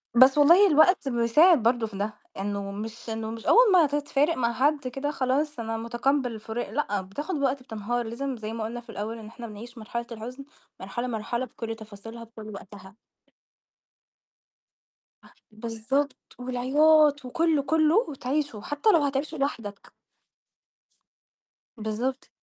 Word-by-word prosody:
بس 260 +3 +7
والله 340 +8 +7
الوقت 315 -2 +4
بيساعد 245 +5 +4
برضه 235 -1 +2
في 200 -2 -9
ده، 210 +2 -2 0.3
إنه 200 0 -3
مش 220 +3 -7
إنه 220 0 -4
مش 225 0 -8
أول 475 -3 +6
ما 345 -3 +6
تفارق 290 +2 0
مع 235 -1 +1
حد 285 0 +1
كده 270 +4 -3
خلاص 280 +1 -1
أنا 225 0 -3
مُتقبل 245 +3 0
الفراق 220 0 -5
لأ، 210 -5 -1
بتاخد 290 - -5
وقت، 275 -2 0
بتنهار 235 +1 -3
لازم 255 +3 -4
زَي 220 0 -6
ما 225 -1 -4
قُلنا 230 +2 -4
في 235 - -23
الأول 215 +3 -5
إن 215 - -10
إحنا 235 +1 -9
بنعيش 230 +3 -10
مرحلة 235 +2 -5
الحزن 245 +5 -8 0.3
مرحلة، 245 +1 -4
مرحلة 235 +2 -2
بكلّ 225 -2 -6
تفاصيلها، 225 +1 -10
بكلّ 220 -1 -11
وقتها. 195 0 -12 2.3
ه - - -17 0.2
بالضبط، 230 +6 -3
والعياط، 285 +4 +3
وكلّه، 320 +3 +1
كلّه 315 +1 +3
وتعيشه، 275 -3 -3
حتى 290 - 0
لو 330 -5 +4
هتعيشه 285 +3 -2
لوحدك. 230 -8 -4 1.9
بالضبط. 225 +5 -3
240 Hz, 140 wpm, -26 LUFS, 225-285 Hz, 2.3 s, بس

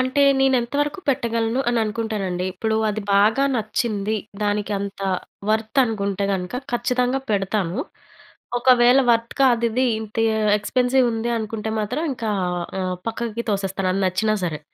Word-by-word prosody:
అంటే 260 +2 +2 0.2
నేను 270 -1 +4
ఎంత 235 +4 -7
వరకు 295 +5 -2
పెట్టగలను 230 -1 0
అని 240 -1 +1
అనుకుంటానండి. 210 -5 -2
ఇప్పుడు 220 +3 -1
అది 210 +1 -2
బాగా 220 +7 +4
నచ్చింది, 215 -1 -1 0.3
దానికి 205 0 -1
అంత 200 0 -6 0.5
వర్త్ 220 +3 0
అనుకుంటే 200 -3 -2
గనుక 180 +4 -3 0.2
ఖచ్చితంగా 250 +2 0
పెడతాను. 195 -3 0 0.8
ఒకవేళ 250 +1 +5
వర్త్ 230 0 +1
కాదు 240 -3 +4
ఇది 255 +3 +1 0.2
ఇంత 220 -1 -9 0.4
ఎక్స్‌పెన్సివ్ 250 +4 +2
ఉంది 225 +1 -2
అనుకుంటే 220 0 -4
మాత్రం 215 +9 -2
ఇంకా 230 -3 -3 0.5
ఆహ్, 185 -1 -2
పక్కకి 230 0 -4
తోసేస్తాను 195 -2 -1
అది 195 - 0
నచ్చినా 215 +4 +1
సరే. 155 -3 -3
220 Hz, 140 wpm, -22 LUFS, 200-240 Hz, 0.8 s, ఒకవేళ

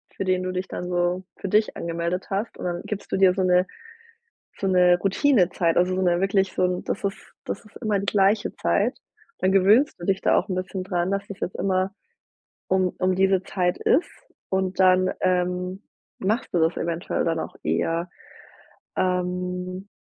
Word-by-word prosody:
für - - -3
den 185 -1 +1
du 185 0 -3
dich 185 +1 -3
dann 180 - -5
so 175 +1 0
für 195 - -5
dich 215 +2 +2
angemeldet 170 +2 -3
hast 200 +4 -3
und - - -8
dann 175 -1 -2
gibst 210 -2 -6
du - - +1
dir 190 -1 +5
so 190 0 0
'ne 180 0 +3 0.9
so 195 - -1
'ne 180 -1 +4
Routinezeit. 190 - +2
Also 180 +1 +3
so 190 - 0
'ne 175 -1 +2
wirklich 195 -1 +1
so - - 0
'n 180 0 0
das - - -3
ist 195 -1 -1 0.3
das - - -5
ist 215 - -19
immer 215 -3 0
die 195 - -3
gleiche 200 +1 +2
Zeit. - - +1 0.4
Dann 185 - +2
gewöhnst 200 +9 +4
du 175 - -6
dich 195 0 +1
da - - +3
auch 185 - 0
'n 190 - -2
bisschen 185 +1 -3
daran, 180 -1 -1
dass 200 +1 -2
es 195 - -9
jetzt 185 - -4
immer 190 0 0 0.8
um 185 -1 +2
um 185 0 +1
diese 190 0 +2
Zeit 180 -2 -1
ist. 345 - +2 0.4
Und 190 0 -1
dann, 185 0 +5
ähm, 180 +1 0 0.3
machst 215 +6 -1
du - - +3
das 160 +1 +2
eventuell 170 0 -2
dann 165 -1 0
auch - - -6
eher. 170 +2 -1 0.9
Ähm. 180 +1 -2
185 Hz, 190 wpm, -24 LUFS, 180-195 Hz, 0.9 s, dir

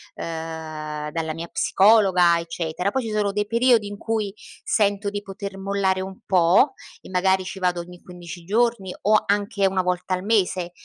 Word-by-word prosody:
uhm, 155 -2 -5
dalla 160 -1 -3
mia 165 +2 -6
psicologa, 190 -5 +4
eccetera. 170 +3 -3
Poi 265 - -1
ci 225 - -4
sono 210 -1 0
dei 210 +1 -1
periodi 235 -2 +3
in 205 - -6
cui 215 -3 -2 0.3
sento 205 -4 +1
di 205 0 -4
poter 200 -1 -7
mollare 195 -1 0
un 190 0 -7
pò, 185 - +4 0.3
e - - -13
magari 185 0 +2
ci 190 - -7
vado 180 -1 0
ogni 175 +1 -10
15 175 -1 -10
giorni 210 -1 0
o 215 +1 +4
anche 200 0 0
1 190 -1 0
volta 180 +1 -1
al 185 - -6
mese. 185 -5 +1
190 Hz, 170 wpm, -23 LUFS, 175-205 Hz, 0.3 s, psicologa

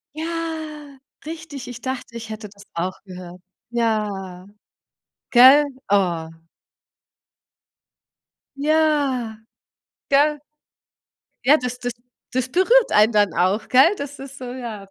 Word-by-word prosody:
Ja, 315 -3 -5 0.3
richtig, 310 -5 -8
ich 245 -1 -8
dachte, 260 -2 -5
ich 225 -1 -8
hätte 215 -1 -7
das 200 0 -16
auch 180 +3 -3
gehört. 180 -2 -11 0.3
Ja, 205 -6 -2 0.8
gell? 265 +4 +8 0.2
Oh. 175 -5 +1 2.3
Ja, 285 -6 +1 0.7
gell? 295 +2 +3 1.1
Ja, 290 +4 +6
das 250 -2 -5
das 245 -1 -3 0.4
das 255 0 -1
berührt 455 - +3
einen 215 +2 +5
dann 205 -4 +3
auch, 190 +5 +1
gell? 270 +10 +5
Das 285 0 -7
ist 275 0 -10
so, 255 - -8
ja,, 235 -5 -7
250 Hz, 110 wpm, -22 LUFS, 210-295 Hz, 2.3 s, gell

